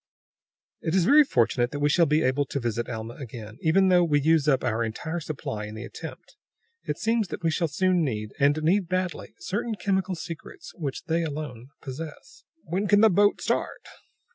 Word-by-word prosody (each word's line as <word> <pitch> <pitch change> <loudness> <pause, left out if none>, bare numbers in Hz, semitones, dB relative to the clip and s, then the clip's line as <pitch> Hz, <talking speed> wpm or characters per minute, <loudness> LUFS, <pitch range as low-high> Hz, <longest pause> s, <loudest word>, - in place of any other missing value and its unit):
"It 160 - -1
is 185 -3 +3
very 295 +7 +7
fortunate 120 - +1
that 145 - -5
we 145 - +3
shall 170 +2 +4
be 150 +2 +2
able 130 +2 +1
to 140 - -3
visit 120 -1 -2
Alma 115 0 -5
again, 115 -4 -9
even 190 +4 +4
though 180 -1 +5
we 150 -3 +3
use 155 0 +3
up 135 -3 +3
our 115 -1 0
entire 160 +10 -3
supply 130 -9 -5
in 105 - -8
the 110 - -6
attempt. - - -10 0.5
It - - -2
seems 225 -2 +1
that 175 - -7
we 165 - +2
shall 165 +1 0
soon 180 +3 +2
need, 105 -6 -3
and 145 +1 +4
need 180 +2 +2
badly, 185 -3 -2
certain 215 - -3
chemical 190 -1 0
secrets 170 - -9
which 145 -6 -5
they 165 +1 0
alone 145 -6 -5 0.2
possess." 160 - -8 0.2
"When 185 +5 -2
can 205 +1 +5
the 220 -1 +6
boat 205 +3 +3
start?" - - -1
160 Hz, 190 wpm, -26 LUFS, 130-185 Hz, 0.5 s, very